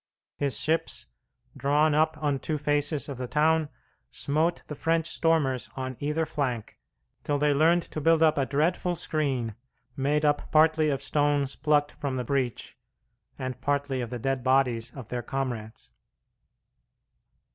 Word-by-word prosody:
His 135 -7 0
ships, 160 +3 0 0.5
drawn 145 +3 +2
up 155 +1 +2
on 145 -3 0
two 155 +2 -2
faces 145 0 0
of 140 -3 -6
the 125 - -3
town, 155 +2 +2 0.4
smote 160 +4 -1
the - - -6
French 165 +2 0
stormers 160 -7 +1
on 130 -1 -4
either 150 +3 0
flank 125 -8 -3 0.4
till 145 - 0
they 145 0 +2
learned 165 +4 +4
to 155 - -6
build 165 +1 +4
up 155 -1 +5
a 135 -2 0
dreadful 170 +5 +1
screen, 135 -9 -1 0.4
made 145 +3 +1
up 145 0 +1
partly 155 0 +4
of 140 -1 -1
stones 145 -1 +1
plucked 145 -1 +2
from 140 -2 -4
the 125 - -2
breach, 130 -3 -2 0.6
and 130 -1 -5
partly 140 -2 0
of 120 - -4
the 125 - -4
dead 135 +1 -2
bodies 125 -3 +2
of 130 -5 -9
their 125 -1 -2
comrades. 110 - -5
145 Hz, 150 wpm, -27 LUFS, 130-155 Hz, 0.6 s, up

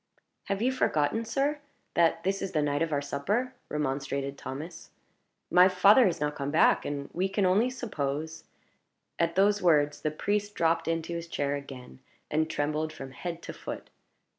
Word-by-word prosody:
"Have 200 +2 -1
you 255 - +3
forgotten, 220 - +1
sir, 280 +5 0 0.3
that 165 -1 +2
this 195 +1 0
is 195 - -4
the 155 - +2
night 145 0 0
of 165 -1 0
our 145 -1 0
supper?" 205 - -1 0.2
remonstrated 140 -1 -2
Thomas. 160 +6 -8 0.6
"My 180 +1 +7
father 200 +6 +6
has 175 - -1
not 150 0 -1
come 140 -1 -3
back, 155 - +4
and 140 -1 -3
we 185 +3 0
can 195 0 +1
only 205 +7 +3
suppose 160 - -4 0.4
" - - -51
At 170 0 +1
those 205 +2 +3
words 150 -4 +3
the 155 - 0
priest 205 +6 -2
dropped 165 0 +1
into 165 0 -1
his 170 0 -5
chair 145 -4 -1
again, 130 - -8 0.3
and 155 +1 +1
trembled 155 +1 -1
from 135 -3 -9
head 170 +5 -6
to - - -6
foot. - - -8
165 Hz, 175 wpm, -29 LUFS, 145-195 Hz, 0.6 s, My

